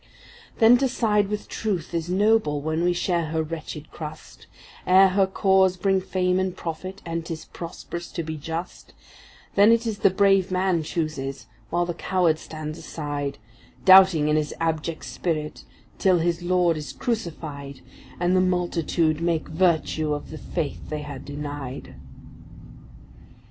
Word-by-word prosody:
Then 235 +1 +6
to 270 - +2
side 210 -4 +2
with 210 +1 -4
Truth 190 -7 -3
is 170 0 -2
noble 200 -5 +2
when 160 +3 -1
we 175 - +3
share 175 -1 0
her 160 +1 -1
wretched 155 -1 -7
crust, 155 0 -9 0.4
Ere 190 +1 +7
her 190 +1 +2
cause 190 -1 +3
bring 195 0 +2
fame 185 0 0
and 185 -1 -2
profit, 185 +4 -6
and 165 0 -3
’tis 160 -1 -6
prosperous 170 0 -7
to 170 - -3
be 160 0 -5
just; 165 +4 -6 0.6
Then 205 +2 +6
it 230 0 +3
is 220 -3 -3
the - - +5
brave 195 0 +3
man 185 -2 +1
chooses, 150 -4 -4 0.2
while 175 +1 +1
the 175 - -3
coward 175 -2 +1
stands 155 0 -7
aside, 145 -2 -4 0.5
Doubting 185 -5 +7
in 150 0 +3
his 150 -1 -2
abject 160 0 -2
spirit, 155 -3 -3 0.3
till 185 -2 +4
his 170 +1 0
Lord 175 -2 +2
is 150 - -6
crucified, 155 - -4 0.4
And 175 +1 +2
the 185 - +4
multitude 170 -3 0
make 170 -2 0
virtue 160 -3 +1
of 145 - -8
the 155 - -7
faith 165 -5 -4
they 150 -1 -4
had 145 -2 -8
denied. 145 -2 -6
170 Hz, 150 wpm, -24 LUFS, 155-185 Hz, 0.6 s, Ere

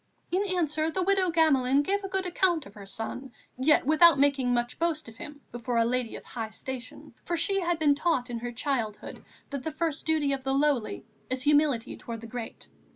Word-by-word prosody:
In 370 +2 +2
answer, 315 -4 0
the 370 +3 -1
widow 385 -1 +2
Gamelin 285 -4 +3
gave 400 +4 0
a - - -3
good 385 0 -1
account 355 -3 +1
of 200 - -13
her 200 -2 -11
son, 240 +5 -6 0.3
yet 295 +2 +4
without 315 +1 +6
making 275 -3 +3
much 240 +1 -1
boast 330 -3 -1
of 225 0 -12
him 290 +2 -9
before 240 0 -3
a 230 - +4
lady 245 -1 -1
of - - -8
high 225 -3 -5
station, 250 +2 -8
for 345 - -2
she 390 +4 +1
had 345 -2 0
been 300 -2 +4
taught 285 -5 0
in 235 - -3
her 240 +1 -4
childhood 235 -4 -3 0.3
that 280 -2 -3
the 315 - -3
first 320 -1 -3
duty 305 -3 +2
of 270 -1 -4
the 270 0 0
lowly 275 -8 0 0.2
is 255 0 -2
humility 290 -5 +2
towards 230 -2 -7
the - - -8
great. 235 0 -7
280 Hz, 210 wpm, -28 LUFS, 245-325 Hz, 0.3 s, without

